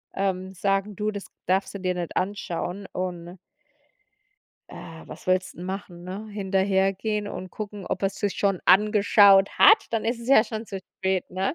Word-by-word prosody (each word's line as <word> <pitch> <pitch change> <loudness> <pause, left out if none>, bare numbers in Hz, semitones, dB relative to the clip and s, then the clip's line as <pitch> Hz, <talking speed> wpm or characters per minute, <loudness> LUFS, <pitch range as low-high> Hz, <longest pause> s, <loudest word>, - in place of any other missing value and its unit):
ähm, 190 -1 -2
sagen: 195 +2 -1
„Du, 215 +1 -1
das 200 -1 -7 0.2
darfst 190 +2 0
du - - -4
dir 185 -1 -1
nicht 175 -2 -4
anschauen.“ 195 0 -3
und 180 -1 -5 1.3
Äh, 160 0 -10
was - - -11
willst 185 0 0
denn 175 - -8
machen, 180 -2 -7
ne? 195 +4 -6
Hinterhergehen 195 +1 0
und 185 -2 -7
gucken, 205 -2 -7
ob 185 - -3
er's 195 - 0
sich 205 -2 -2
schon 195 -3 +1
angeschaut 200 0 +5
hat, 425 +1 +7
dann 225 -1 -1
ist 235 +1 -1
es 235 - -9
ja 240 -4 +6
schon 220 0 -6
zu 195 -2 -6 0.2
spät, 190 -1 0
ne? 190 - -2
195 Hz, 170 wpm, -25 LUFS, 185-210 Hz, 1.3 s, hat